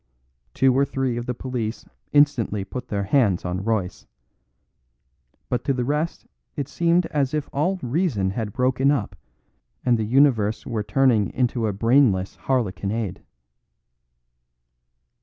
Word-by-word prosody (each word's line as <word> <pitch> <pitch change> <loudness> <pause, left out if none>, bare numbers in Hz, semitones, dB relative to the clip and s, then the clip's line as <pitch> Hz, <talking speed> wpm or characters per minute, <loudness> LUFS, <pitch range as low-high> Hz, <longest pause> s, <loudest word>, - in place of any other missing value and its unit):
Two 130 0 +3
or 135 - +4
three 135 -3 -1
of 120 0 -5
the 125 - -2
police 120 -3 -4 0.3
instantly 125 -9 +2
put 125 +6 -7
their 100 -1 -2
hands 100 -5 +2
on 90 +2 -3
Royce; 105 -4 -2 1.4
but 120 -1 -2
to 140 - +2
the 125 -1 -1
rest 150 +5 -2 0.3
it 140 -3 -3
seemed 170 +3 +2
as 140 -1 0
if 150 -2 -2
all 175 +7 0
reason 125 - 0
had 105 0 -3
broken 130 +4 +1
up 110 -9 -1 0.7
and 120 -2 +3
the - - 0
universe 115 -3 +2
were 115 -3 -2
turning 120 -2 +2
into 125 -3 0
a - - 0
brainless 115 -3 +2
harlequinade. 110 -4 -1
125 Hz, 135 wpm, -23 LUFS, 105-140 Hz, 1.4 s, or